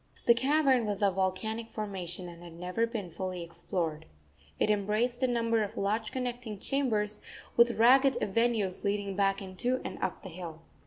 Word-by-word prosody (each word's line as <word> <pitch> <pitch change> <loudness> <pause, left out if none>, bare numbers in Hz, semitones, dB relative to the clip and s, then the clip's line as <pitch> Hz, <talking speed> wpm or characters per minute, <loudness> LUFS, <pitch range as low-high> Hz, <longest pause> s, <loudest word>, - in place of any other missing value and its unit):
The 235 - +8
cavern 265 -1 +3
was 205 -1 -1
of 200 -2 +4
volcanic 220 +5 -1
formation 185 -4 -5
and 170 -1 -10
had 170 -1 -10
never 180 +7 -1
been 210 -7 -5
fully 180 +1 -4
explored. 165 -2 -3 0.5
It 215 - +3
embraced 215 +5 +1
a 260 - +4
number 230 -2 +1
of 210 +1 -3
large 215 +3 0
connecting 245 -4 -4
chambers, 215 -5 0 0.4
with 235 0 +5
ragged 260 +4 +6
avenues 210 -3 +1
leading 200 -1 -1
back 195 0 +1
into 220 +7 -1
and - - -5
up - - -2
the 190 - -7
hill. 165 -2 -8
210 Hz, 165 wpm, -30 LUFS, 185-235 Hz, 0.5 s, The